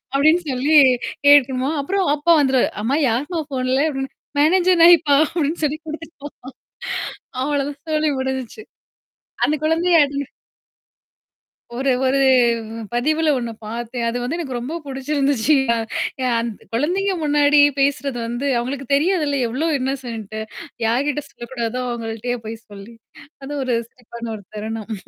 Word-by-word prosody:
அப்டின்னு 310 +5 +4
சொல்லி 280 +5 +3 0.5
கேக்குமா, 270 -2 +5
அப்புறம் 385 +6 0
அப்பா 300 +3 +1
வந்துருவாரு, 265 -2 +2
அம்மா 260 +6 +1
யார்ம்மா 295 +9 -1
ஃபோன்ல? 260 0 0
அப்டின்னு 270 -1 -4 0.3
மேனேஜர் 360 +3 +4
நாய்ப்பா 335 -4 +6
அப்டின்னு 320 0 -2
சொல்லி 295 +1 -1
குடுத்துட்டுப்போ 315 -2 -8 1.2
அவ்ளோதான் 285 0 -2
சொல்லி 305 0 +2
முடிஞ்சுச்சு. 265 - -4 0.8
அந்த 300 - +2
குழந்தைய 330 +2 +3
அடி 280 0 -3 1.6
ஒரு 265 +2 +1 0.2
ஒரு 275 +1 +2 0.7
பதிவுல 310 +6 +1
ஒண்ணு 235 -2 -3
பார்த்தேன். 235 +2 -4
அது 240 - -3
வந்து 300 +8 -2
எனக்கு 265 -8 -4
ரொம்ப 270 +7 -5
பிடிச்சிருந்துச்சுயா! 270 -2 +1 0.6
அந்த் 230 -2 -5
குழந்தைங்க 370 +10 0
முன்னாடியே 290 0 +5
பேசுறது 280 -2 0
வந்து, 240 +4 -4
அவங்களுக்கு 265 +2 -4
தெரியாதுல்ல 300 -3 +1
எவ்ளோ 275 +8 -1
இன்னோசென்ட் 240 -5 -4 0.5
யார்கிட்ட 275 +5 0
சொல்லக்கூடாதோ 240 0 -5
அவங்கள்ட்டயே 235 +1 -4
போய் 225 +1 -5
சொல்லி. 205 +3 -11 0.5
அது 270 - -7
ஒரு 255 -2 0
சிரிப்பான 235 -1 -9
ஒரு 205 - -11
தருணம். 220 +1 -5
275 Hz, 120 wpm, -20 LUFS, 240-300 Hz, 1.6 s, நாய்ப்பா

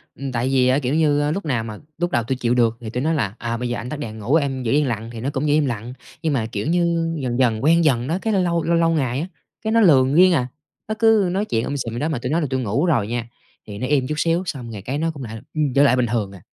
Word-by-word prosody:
ừm, 135 -1 -5
tại 125 +2 -1
vì 130 -2 +3
á, 130 +3 +3
kiểu 130 0 -2
như, 145 -2 +2
lúc 195 0 -3
nào 125 -6 0
mà 110 -2 -7 0.2
lúc 175 +1 -1
đầu 120 - +1
tui 130 +4 -2
chịu 125 -1 0
được, 115 -2 +2
thì 110 - -6
tui 125 +3 -3
nói 160 - +1
là 110 -9 -1
"À, 115 0 -3
bây 125 0 -3
giờ 120 - -2
anh 125 +2 -6
tắt 150 - -5
đèn 110 -5 -6
ngủ, 115 +8 +1
em 135 -4 0
giữ 115 - -1
yên 145 -1 +3
lặng", 115 -1 -3
thì 115 - -7
nó 135 - -1
cũng 140 +3 -1
giữ 145 - +3
im 150 -1 +3
lặng. 120 0 -4 0.3
Nhưng 155 -3 0
mà, 115 -5 0
kiểu 100 +6 -3
như, 170 -1 +1
dần 125 -1 -2
dần 115 -3 +2
quen 165 +3 +4
dần 125 -4 +2
đó, 165 +3 0
cái 220 -1 0
lâu 195 - +3
lâu 170 -1 0
lâu 170 - +1
lâu 165 0 +3
ngày 135 -6 0
á, 170 - -3 0.4
cái 220 - -1
nó 230 - +5
lờn 135 -6 +5
riêng 185 +1 +6
à. 125 -5 +1 0.4
Nó 215 - -2
cứ 220 -5 +4
nói 200 +3 0
chuyện 115 - -1
um 140 - -3
sùm 115 -5 -4
vậy 120 - -4
đó, 155 - -1
mà 145 - -2
tui 125 +1 -4
nói 170 - +1
là 150 - -1
tui 130 -1 -1
ngủ 120 - 0
rồi 125 - +1
nha, 120 0 -3 0.4
thì 100 -1 -7
nó 130 - -3
im 135 -3 +1
chút 150 - -2
xíu, 170 +3 +1
xong 125 -7 -5
rồi 100 -3 -7
cái 130 +7 -3
nó 165 +2 0
cũng 140 -4 -9
lại, 110 -1 -7
ừm, 150 -4 0
trở 140 - +6
lại 135 -3 +5
bình 125 -1 +2
thường 105 -4 -1
à. 95 - -13
135 Hz, 325 wpm, -21 LUFS, 120-160 Hz, 0.4 s, riêng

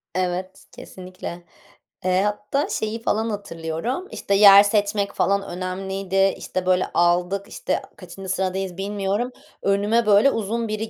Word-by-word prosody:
Evet, 185 +1 -3
kesinlikle. 180 -1 -9 0.6
Eee, 185 0 +3
hatta 210 +7 -1
şeyi 220 +1 -3
falan 220 +2 0
hatırlıyorum, 200 - -4
işte, 200 - -1
yer 200 0 +9
seçmek 205 -1 0
falan 200 0 +1
önemliydi, 190 +1 -1
işte, 185 -1 -4
böyle, 185 0 +3
aldık, 180 +3 +1
işte, - - -2
a - - -18
kaçıncı 185 +1 -10
sıradayız 190 -1 -2
bilmiyorum. 205 +4 -2 0.3
Önüme, 205 +4 +2
böyle, 210 +6 +5
uzun 225 +2 -2
biri 215 +1 -3
195 Hz, 130 wpm, -23 LUFS, 185-210 Hz, 0.6 s, yer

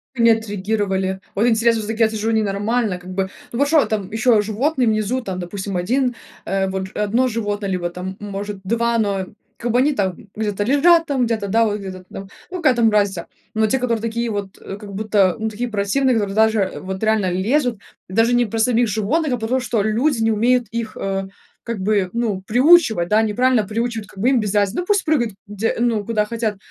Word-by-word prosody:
Они 230 -2 +4
отреагировали. 200 -3 0
Вот 215 +4 +2
интересно, 230 0 +3
всё-таки 225 +2 0
я 220 - +4
сижу 220 0 -2
ненормально 215 -1 0
как 180 - -12
бы. 190 0 -1 0.2
Но 235 - -4
вот 285 - +3
что 310 0 +4
там 205 -3 -3
ещё 225 -1 +3
животные 245 +5 0
внизу, 215 +4 0
там, 190 -6 -5
допустим, 190 +2 -5
1, 245 +8 0 0.3
э, 195 0 0
вот 190 0 -5
1 225 +5 +1
животное, 205 -3 -2
либо 180 -2 -1
там 180 +2 -6
может 205 0 -5
2, 230 +3 +1
но 200 -3 0 0.3
как 240 0 -2
бы 245 - +3
они 290 +3 +3
там 190 -7 -1 0.2
где-то 210 -2 -1
лежат, 330 +6 +5
там 265 -4 +1
где-то, 220 -3 -2
да, 225 +3 +3
вот 210 -1 -1
где-то 185 -2 -8
там, 195 - -8 0.2
ну, 365 - -3
какая 305 -8 +3
там 230 -2 +3
разница. 200 -4 +1 0.3
Но 220 0 +3
те, 265 +5 +1
которые 235 -3 0
такие 230 +1 -2
вот, 200 -3 -4
э, 195 - -7
как 205 -1 -10
будто, 200 -2 +2
ну 220 0 -1
такие 235 +3 -4
противные, 225 +6 +1
которые 200 -3 -1
даже 220 -3 +3
вот 190 0 -5
реально 215 -4 +2
лезут, 230 +5 0 0.3
даже 225 +5 +3
не 240 0 +3
про 225 +1 -4
самих 235 +1 +3
животных, 250 - 0
а 245 - 0
потому 230 +4 -1
что 230 -2 0
люди 230 +5 +1
не 225 0 +3
умеют 240 +2 +2
их, 230 -1 -4
э, 195 0 -2 0.4
как 230 -3 -4
бы, 195 -1 +1
ну, 225 -5 -1
приучивать, 245 - +4
да, 215 +3 +3
неправильно 240 +2 +2
приучивать, 225 0 -3
как 200 - -14
бы 235 +6 +3
им 265 -2 +3
без 210 -2 -2
разницы. 205 - +1
Ну - - -6
пусть 405 0 +1
прыгают 250 - +1
где, 210 +2 -2
ну, 230 -3 +1
куда 215 -1 0
хотят, 220 -2 -2
220 Hz, 210 wpm, -20 LUFS, 200-235 Hz, 0.4 s, лежат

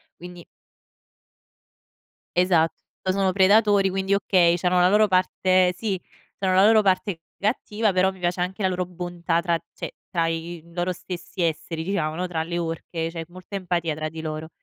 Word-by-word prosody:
quindi 175 0 -11 2.0
Esatto, 170 -3 +3 0.3
poi 185 - 0
sono 195 -1 +2
predatori 200 +1 +4
quindi, 190 +1 -1
okay 185 -3 +3
c'hanno 180 +1 +2
la 180 0 +5
loro 210 +2 +5
parte 185 -1 +2
sì 195 -2 -2 0.4
c'hanno 190 -1 0
la 190 +2 +6
loro 220 -1 +5
parte 190 -2 0 0.2
cattiva 215 0 0
però 185 +1 +2
mi 190 - -15
piace 175 0 -1
anche 190 +3 -3
la 190 - +3
loro 180 -1 -1
bontà 175 -1 -2
tra 170 0 +1 0.2
cioè - - -7 0.2
tra 165 -2 +1
i, 165 0 -4
uhm, 170 - -19
loro 175 +1 0
stessi 180 +1 -7
esseri 165 0 -1
diciamo, 165 -4 -1
no, 180 +3 -3
tra 165 -3 -2
le 170 +1 -3
orche 165 0 -3
c'è 165 -1 -5
molta 185 +3 -10
empatia 175 -4 -1
tra 155 0 -3
di 160 +1 -7
loro. 155 0 -5
180 Hz, 175 wpm, -24 LUFS, 170-190 Hz, 2.0 s, la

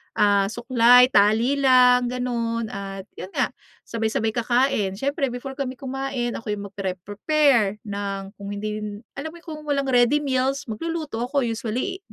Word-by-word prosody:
ah, 200 -1 +4
suklay, 245 +2 +5
tali 220 +7 +4
lang, 250 -2 +5
gano'n. 235 -2 -2
At 195 0 -7
yun 185 - -8
nga, - - +1 0.3
sabay-sabay 225 -1 -1
kakain. 240 -3 +1
Siyempre 275 +5 -1
before 265 +3 -7
kami 260 -2 -3
kumain, 270 -2 -3
ako'y 215 -2 -4
magpre-prepare 205 - 0
ng 200 -1 -5
kung 200 - -8
hindi 210 +1 -4
yun 210 - -4 0.3
alam 315 +3 -5
mo 340 - -13
kung 305 -2 -8
walang 275 -2 0
ready 245 +4 +4
meals, 265 0 -1
magluluto 305 -2 -3
ako, 275 0 0
usually 230 - -3
240 Hz, 145 wpm, -23 LUFS, 210-270 Hz, 0.3 s, suklay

